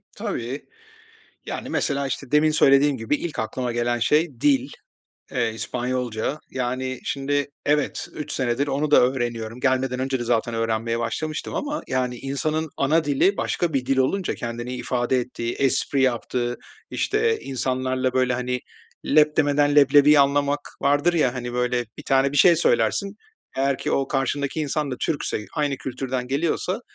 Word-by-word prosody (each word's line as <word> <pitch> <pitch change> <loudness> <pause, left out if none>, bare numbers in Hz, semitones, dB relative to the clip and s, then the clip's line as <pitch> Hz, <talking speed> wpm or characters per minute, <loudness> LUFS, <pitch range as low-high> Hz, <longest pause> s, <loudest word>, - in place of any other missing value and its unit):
Tabii. 120 +4 -4 0.8
Yani, - - -5
mesela, 140 -2 0
işte, 135 0 -5
demin 150 +1 +4
söylediğim 140 -2 +4
gibi 115 +5 0
ilk 165 -1 -5
aklıma 125 +2 -2
gelen 120 0 0
şey 150 +7 +3
dil, 270 -2 +3 0.6
eee, 120 -4 0
İspanyolca. 125 +2 -2
Yani, 130 0 -3
şimdi 140 +1 -1 0.2
evet, 150 0 0
3 150 -1 -6
senedir 130 0 0
onu 145 +2 -1
da - - +7
öğreniyorum. 120 -2 -1
Gelmeden 130 -1 +1
önce 130 0 -1
de 120 - -3
zaten 115 0 0
öğrenmeye 115 0 -1
başlamıştım 155 +6 -3
ama, 295 +1 -3
yani, 125 -1 -1
insanın 155 +4 -2
ana 155 +4 +2
dili 150 +8 +2
başka 175 -2 -1
bir 130 -2 -1
dil 135 0 +1
olunca 170 +9 +1
kendini 120 +1 -5
ifade 125 +1 0
ettiği, 120 -1 -4
espri 135 0 +1
yaptığı, 120 -1 0 0.3
işte, 445 +2 +1
insanlarla, 130 -1 -1
böyle, 130 -1 +2
hani, 125 0 -2 0.5
leb 150 0 +4
demeden 145 -1 +3
leblebiyi 145 +1 +7
anlamak 140 +1 +2 0.2
vardır 145 +5 +3
ya, 135 -7 +2
hani, 120 -1 -5
böyle. 125 0 0
Bir - - -7
tane 135 +1 +2
bir - - -2
şey 170 +4 +6
söylersin 135 - +1 0.4
eğer 135 0 +1
ki - - -3
o 135 0 0
karşındaki 140 +2 -1
insan 150 -1 -1
da 125 - -3
Türkse, 145 -8 -2
aynı 145 -3 0
kültürden 130 -1 -4
geliyorsa 170 - -1
135 Hz, 155 wpm, -23 LUFS, 125-145 Hz, 0.8 s, da